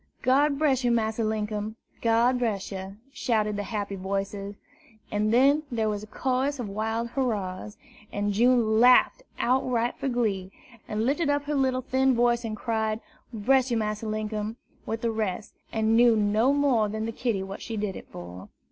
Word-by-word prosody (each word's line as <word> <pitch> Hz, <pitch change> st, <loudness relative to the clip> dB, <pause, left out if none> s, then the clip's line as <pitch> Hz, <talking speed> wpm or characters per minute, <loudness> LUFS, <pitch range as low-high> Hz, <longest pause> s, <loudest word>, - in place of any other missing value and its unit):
"God 280 Hz, +3 st, +3 dB
bress 275 Hz, -4 st, +2 dB
yer, 245 Hz, -, +2 dB
Massa 225 Hz, -1 st, +1 dB
Linkum, 215 Hz, 0 st, -2 dB, 0.3 s
God 235 Hz, +2 st, +3 dB
bress 215 Hz, -6 st, -2 dB
yer!" 190 Hz, +1 st, -6 dB, 0.2 s
shouted 215 Hz, -5 st, 0 dB
the 205 Hz, -, -2 dB
happy 205 Hz, -2 st, -3 dB
voices; 195 Hz, +1 st, -4 dB, 0.6 s
and 210 Hz, +1 st, +1 dB
then 275 Hz, +5 st, +5 dB
there 220 Hz, -2 st, 0 dB
was 205 Hz, -1 st, -2 dB
a 215 Hz, -, -10 dB
chorus 265 Hz, +5 st, -1 dB
of 245 Hz, -4 st, -4 dB
wild 220 Hz, +3 st, -2 dB
hurrahs, 210 Hz, -6 st, -3 dB, 0.3 s
and 205 Hz, 0 st, -1 dB
June 230 Hz, 0 st, +3 dB
laughed 250 Hz, -, +5 dB, 0.2 s
outright 245 Hz, -1 st, +1 dB
for -, -, -2 dB
glee, 210 Hz, -7 st, -1 dB, 0.4 s
and 215 Hz, +1 st, -1 dB
lifted 290 Hz, +4 st, +1 dB
up 285 Hz, 0 st, +1 dB
her 295 Hz, +1 st, -3 dB
little 260 Hz, -2 st, +1 dB
thin 265 Hz, 0 st, +2 dB
voice 240 Hz, 0 st, +2 dB
and 220 Hz, -2 st, -4 dB
cried, 220 Hz, -1 st, -1 dB, 0.3 s
"Bress 255 Hz, +4 st, +2 dB
yer, 235 Hz, -, +1 dB
Massa 215 Hz, 0 st, -2 dB
Linkum!" 215 Hz, 0 st, -3 dB, 0.3 s
with 225 Hz, 0 st, -3 dB
the 235 Hz, -, 0 dB
rest, 215 Hz, -2 st, -3 dB, 0.2 s
and 220 Hz, 0 st, +2 dB
knew 235 Hz, 0 st, +6 dB
no 215 Hz, +4 st, +3 dB
more 270 Hz, -7 st, +2 dB
than 220 Hz, +1 st, -3 dB
the 230 Hz, -, -2 dB
kitty 225 Hz, -4 st, -1 dB
what 195 Hz, +1 st, -7 dB
she 225 Hz, -2 st, -5 dB
did 205 Hz, -3 st, -2 dB
it -, -, -9 dB
for. 90 Hz, +1 st, -10 dB
225 Hz, 175 wpm, -27 LUFS, 210-250 Hz, 0.6 s, knew